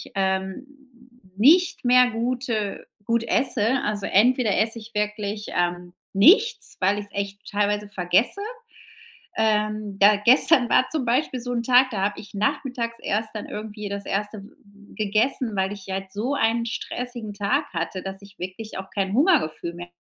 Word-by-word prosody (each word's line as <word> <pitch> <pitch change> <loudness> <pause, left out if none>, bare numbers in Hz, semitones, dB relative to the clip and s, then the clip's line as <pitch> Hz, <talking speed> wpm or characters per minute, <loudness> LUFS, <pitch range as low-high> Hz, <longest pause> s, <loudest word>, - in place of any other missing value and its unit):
ähm, 190 +5 -1 0.7
nicht 350 - +4
mehr 250 0 +5
gute 230 -2 -2 0.2
gut 230 0 +1
esse. 245 0 +1
Also, 210 -1 -2
entweder 230 0 +3
esse 225 +2 0
ich 225 0 -11
wirklich, 210 0 -3
ähm, 175 0 -1 0.2
nichts, 420 - +4
weil 195 +2 +2
ich's 205 0 -8
echt 200 0 -4
teilweise 205 0 0
vergesse. 190 - +1 1.0
Ähm, 215 -2 0
da 205 +1 +7
gestern 255 +2 +5
war 255 - +3
zum 310 -5 -2
Beispiel 250 +2 0
so 245 +1 -4
'n 235 -1 -1
Tag, 255 +2 +4
da 210 -5 -3
habe 205 +1 -1
ich 205 -1 -14
nachmittags 235 +1 -2
erst 215 +2 -1
dann 215 - -5
irgendwie 210 -1 -6
das 200 0 -5
erste 210 +2 -2
w - - -13
w 205 -7 -20
gegessen, 220 +2 0
weil 190 +1 0
ich 200 -2 -10
halt 190 0 -4
so 230 +8 -2
einen 230 -3 +1
stressigen 240 -1 -5
Tag 230 +9 0
hatte, 170 +2 -3
dass 195 0 -7
ich 200 0 -16
wirklich 190 +5 -7
auch 190 0 -8
kein 195 -1 -1
Hungergefühl 245 - +2
mehr 175 0 -9
215 Hz, 160 wpm, -24 LUFS, 200-245 Hz, 1.0 s, da